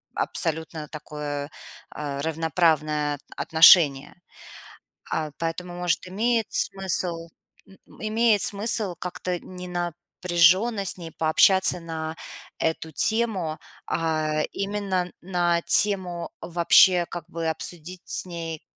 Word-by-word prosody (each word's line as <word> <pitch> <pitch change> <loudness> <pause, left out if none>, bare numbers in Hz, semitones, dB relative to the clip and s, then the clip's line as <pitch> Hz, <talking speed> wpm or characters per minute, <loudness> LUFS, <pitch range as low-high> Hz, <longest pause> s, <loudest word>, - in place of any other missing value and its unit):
абсолютно 160 -2 -2
такое, 150 -1 -6 0.4
а, 140 -2 -5
равноправное 155 -2 0
т - - -28
отношение. 160 -4 +5 0.9
А, 155 -2 -3
поэтому, 175 +2 -4
может, 175 0 -2
имеет 225 +3 0
смысл 175 -3 -1 0.4
м, 195 - -18 0.2
имеет 220 -1 +2
смысл 205 -2 +3
как-то 180 0 -4
не 180 0 -10
напряженно 175 +4 +1
с 185 - +2
ней 165 -2 -9
пообщаться 180 +3 +3
на 160 -1 -6 0.4
эту 160 0 -2
тему. 195 -4 +1 0.3
А 155 -2 -1
именно 195 -3 -3
на 175 -2 0
тему 185 -4 +2
вообще 175 +1 +4
как 175 -2 -7
бы 165 -1 -4
обсудить 170 +2 -4
с - - +2
ней, 165 -3 -6
175 Hz, 105 wpm, -24 LUFS, 160-185 Hz, 0.9 s, отношение